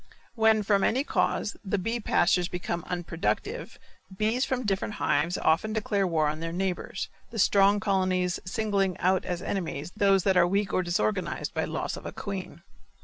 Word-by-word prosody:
When, 220 Hz, -2 st, +3 dB
from 200 Hz, -1 st, +2 dB
any 260 Hz, +4 st, +2 dB
cause, 205 Hz, -, 0 dB
the 205 Hz, 0 st, -1 dB
bee 225 Hz, +6 st, -2 dB
pastures 180 Hz, -4 st, +2 dB
become 175 Hz, -2 st, -4 dB
unproductive 180 Hz, -, -3 dB, 0.4 s
bees 220 Hz, +5 st, +1 dB
from 255 Hz, -3 st, -2 dB
different 205 Hz, +1 st, -1 dB
hives 165 Hz, +5 st, +1 dB
often 200 Hz, +7 st, +1 dB
declare 205 Hz, -3 st, 0 dB
war 160 Hz, -3 st, +1 dB
on 155 Hz, +1 st, -2 dB
their 165 Hz, 0 st, -4 dB
neighbors, 190 Hz, +2 st, -3 dB, 0.2 s
the 230 Hz, -, -8 dB
strong 200 Hz, 0 st, +4 dB
colonies 185 Hz, -3 st, +1 dB
singling 195 Hz, -2 st, 0 dB
out 185 Hz, +1 st, +1 dB
as 175 Hz, 0 st, -3 dB
enemies 170 Hz, -4 st, -3 dB
those 195 Hz, -3 st, +3 dB
that 190 Hz, -2 st, +3 dB
are 175 Hz, -, +5 dB
weak 195 Hz, +1 st, 0 dB
or -, -, +3 dB
disorganized 140 Hz, -, -1 dB
by -, -, 0 dB
the -, -, -7 dB
loss -, -, -3 dB
of -, -, -8 dB
a -, -, -5 dB
queen. 190 Hz, -3 st, -6 dB
190 Hz, 175 wpm, -27 LUFS, 175-210 Hz, 0.4 s, are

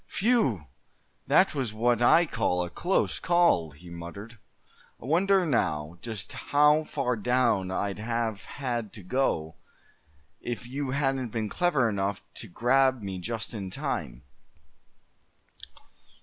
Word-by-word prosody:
"Whew! 195 Hz, -, +2 dB, 0.6 s
that -, -, +4 dB
was 130 Hz, -7 st, -2 dB
what 120 Hz, +1 st, +2 dB
I 165 Hz, +8 st, +6 dB
call 110 Hz, -, 0 dB
a 85 Hz, -, -6 dB
close 185 Hz, +2 st, 0 dB
call!" 170 Hz, -, +3 dB
he 85 Hz, +5 st, -14 dB
muttered. 100 Hz, +7 st, -9 dB, 0.6 s
"I -, -, -11 dB
wonder, 185 Hz, +5 st, +3 dB
now, 85 Hz, -, -1 dB
just 110 Hz, -6 st, -6 dB
how 150 Hz, +2 st, +3 dB
far 130 Hz, -5 st, -1 dB
down 115 Hz, -4 st, +1 dB
I'd 100 Hz, +2 st, -2 dB
have 115 Hz, -2 st, -2 dB
had 120 Hz, -6 st, -4 dB
to 105 Hz, -, -10 dB
go, 85 Hz, -, -1 dB, 0.8 s
if 120 Hz, 0 st, -5 dB
you 135 Hz, +2 st, -4 dB
hadn't 135 Hz, -2 st, 0 dB
been 110 Hz, -1 st, -3 dB
clever 160 Hz, -, +2 dB
enough 100 Hz, -2 st, -2 dB
to 110 Hz, -, -7 dB
grab 130 Hz, +4 st, +2 dB
me 95 Hz, -2 st, -4 dB
just 115 Hz, +5 st, -4 dB
in 100 Hz, -4 st, -5 dB
time?" 80 Hz, -, -4 dB
115 Hz, 130 wpm, -27 LUFS, 95-135 Hz, 0.8 s, I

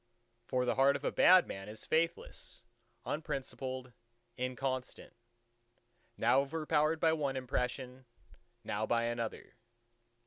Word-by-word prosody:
For 125 Hz, 0 st, +1 dB
the 125 Hz, -, +2 dB
heart 135 Hz, +1 st, +4 dB
of -, -, -5 dB
a -, -, 0 dB
bad 185 Hz, 0 st, +7 dB
man 95 Hz, +1 st, -7 dB
is 110 Hz, 0 st, -8 dB
faithless, 165 Hz, -6 st, -1 dB, 0.4 s
unprincipled, 130 Hz, -3 st, -4 dB, 0.4 s
inconstant: 130 Hz, 0 st, -3 dB, 1.0 s
now 120 Hz, +4 st, +4 dB
overpowered 155 Hz, +2 st, +1 dB
by 160 Hz, -1 st, +4 dB
one 140 Hz, -4 st, -1 dB
impression, 125 Hz, 0 st, -3 dB, 0.6 s
now 105 Hz, +1 st, -2 dB
by 115 Hz, 0 st, +2 dB
another. 115 Hz, -1 st, -3 dB
130 Hz, 110 wpm, -34 LUFS, 125-150 Hz, 1.0 s, bad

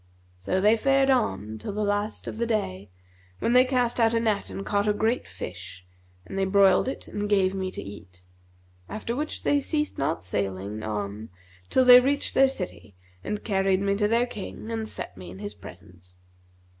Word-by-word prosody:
So 95 Hz, -, -1 dB
they 210 Hz, +4 st, +4 dB
fared 270 Hz, +2 st, +3 dB
on 110 Hz, -, 0 dB
till 155 Hz, -, -5 dB
the 210 Hz, +1 st, -1 dB
last 205 Hz, +1 st, -2 dB
of 220 Hz, -, -6 dB
the 235 Hz, -, 0 dB
day, 100 Hz, -, -2 dB, 0.5 s
when 235 Hz, -, 0 dB
they 250 Hz, 0 st, +7 dB
cast 250 Hz, -2 st, 0 dB
out 230 Hz, 0 st, +3 dB
a -, -, +3 dB
net 215 Hz, -3 st, 0 dB
and 195 Hz, -, -6 dB
caught 205 Hz, 0 st, 0 dB
a 210 Hz, -, +3 dB
great 225 Hz, +4 st, 0 dB
fish 90 Hz, +1 st, -8 dB, 0.4 s
and 195 Hz, -, -5 dB
they 195 Hz, -, +2 dB
broiled 195 Hz, +2 st, +4 dB
it 265 Hz, -, -5 dB
and 205 Hz, 0 st, -4 dB
gave 195 Hz, -2 st, +3 dB
me 190 Hz, -1 st, -2 dB
to -, -, -7 dB
eat; 90 Hz, -3 st, -12 dB, 0.6 s
after 230 Hz, +2 st, -4 dB
which 300 Hz, +3 st, -3 dB
they 285 Hz, -, +3 dB
ceased 300 Hz, +1 st, -2 dB
not 90 Hz, -11 st, -1 dB
sailing 100 Hz, +2 st, -3 dB
on 105 Hz, 0 st, -4 dB, 0.4 s
till 260 Hz, -, +3 dB
they 250 Hz, 0 st, +10 dB
reached 280 Hz, +3 st, 0 dB
their 270 Hz, -, +6 dB
city 180 Hz, -, -7 dB, 0.3 s
and 210 Hz, -, -4 dB
carried 195 Hz, -2 st, +1 dB
me 200 Hz, 0 st, +1 dB
to 210 Hz, +1 st, +1 dB
their 230 Hz, +3 st, +2 dB
King 220 Hz, -1 st, -7 dB
and 220 Hz, -1 st, -3 dB
set -, -, -6 dB
me 90 Hz, -1 st, -9 dB
in 90 Hz, -, -10 dB
his 100 Hz, +1 st, -6 dB
presence. 90 Hz, -2 st, -14 dB
200 Hz, 195 wpm, -26 LUFS, -, 0.6 s, they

